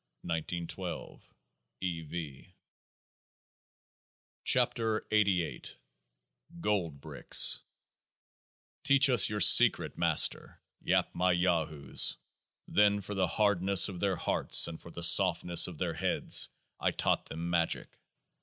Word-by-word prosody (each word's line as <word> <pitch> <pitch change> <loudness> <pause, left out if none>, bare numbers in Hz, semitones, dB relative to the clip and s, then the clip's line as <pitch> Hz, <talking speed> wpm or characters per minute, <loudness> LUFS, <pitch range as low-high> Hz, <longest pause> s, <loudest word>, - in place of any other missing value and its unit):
E. 85 +1 -8
V. 75 -3 -10 2.0
105 115 -3 0
KEOAAH 90 -9 -2 0.8
EM - - -14
GOLD 90 - -3
BRICKS - - +2 1.2
Teach 140 0 +2
us 120 -5 +4
Your 105 -1 -5
secret, 90 - +4
Master! - - +1 0.2
yap - - -2
my 90 +1 -1
Yahoos. 85 -5 0 0.5
Then 105 0 +1
for 105 - -9
the 95 -2 -2
hardness 100 -1 +2
of 90 -3 -10
their 95 0 -2
hearts, - - +2
and 80 -1 -10
for - - -14
the 85 0 -9
softness 85 -1 +4
of 90 -4 -11
their 85 -1 -4
heads, 90 +3 +1 0.3
I - - -1
taught - - -3
them 85 +2 -7
Magick. 85 -1 -4
90 Hz, 105 wpm, -29 LUFS, 85-100 Hz, 2.0 s, us